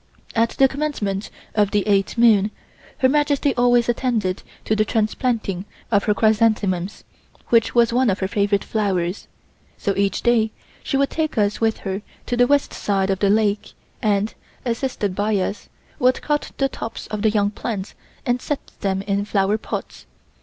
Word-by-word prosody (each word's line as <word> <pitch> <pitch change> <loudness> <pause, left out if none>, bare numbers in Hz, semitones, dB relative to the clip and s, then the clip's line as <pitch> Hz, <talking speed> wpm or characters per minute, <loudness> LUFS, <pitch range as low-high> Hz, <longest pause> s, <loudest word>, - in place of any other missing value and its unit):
At 230 0 +2
the 270 - +6
commencement 260 -9 -2 0.2
of 205 -2 +3
the 205 0 0
eighth 200 +2 +2
moon, 220 -3 +5 0.5
Her 260 - +4
Majesty 290 0 +2
always 245 -1 +3
attended 230 -6 0 0.2
to 215 - +1
the 215 - +3
transplanting 215 -3 -1 0.3
of 205 -2 +3
her 210 - +2
chrysanthemums, 210 -4 +1 0.5
which 230 0 +3
was 235 -1 +4
one 255 -1 +3
of 190 - +1
her 190 - -1
favorite 200 -1 +1
flowers, 190 -4 -1 0.5
so 200 - -1
each 200 -1 0
day 235 -2 +3 0.3
she 275 - -1
would 275 0 +1
take 310 -5 -2
us 205 0 +1
with 225 -1 +2
her 195 +1 -2 0.2
to 245 - -1
the 245 0 +4
west 285 +1 +2
side 195 -1 0
of 190 - -1
the 200 - +3
lake 210 0 +1 0.3
and, 210 0 +1 0.3
assisted 230 -5 -1
by 205 +3 0
us, 195 +2 -3 0.3
would 255 +1 +2
cut 295 -1 -1
the 275 - +2
tops 230 -3 -6
of 210 -1 -3
the 220 - +4
young 205 -1 +1
plants 210 -3 -4 0.3
and 245 0 +1
set 295 - -4
them 195 -1 -1
in 200 0 0
flower 205 +1 +1
pots. - - -6
215 Hz, 170 wpm, -22 LUFS, 200-240 Hz, 0.5 s, the